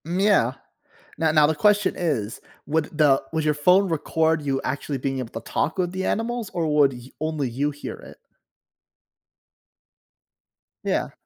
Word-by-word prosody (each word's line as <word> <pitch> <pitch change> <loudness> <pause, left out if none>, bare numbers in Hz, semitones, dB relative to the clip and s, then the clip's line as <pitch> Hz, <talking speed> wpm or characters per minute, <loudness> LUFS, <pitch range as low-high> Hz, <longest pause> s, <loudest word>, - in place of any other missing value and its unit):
Yeah, 180 - +2 0.6
now 160 0 +1
now 155 -1 +6
the 160 - +1
question 205 +5 +3
is, 125 -11 -2 0.3
would 155 0 -1
the 145 -3 +4
would 160 -1 -1
your 150 -1 +2
phone 180 +6 +4
record 160 0 +1
you 135 -2 -1
actually 140 +1 -3
being 135 +1 -2
able 125 -3 -5
to - - -14
talk 160 - -1
with 180 -1 0
the 190 0 -3
animals, 230 0 -2
or 170 -2 -1
would 140 -2 +5
you 125 +1 -11
only 155 -3 -1
you 140 +5 -1
hear 145 0 -7
it? - - -13 2.7
Yeah. - - -1
155 Hz, 155 wpm, -24 LUFS, 140-175 Hz, 2.7 s, now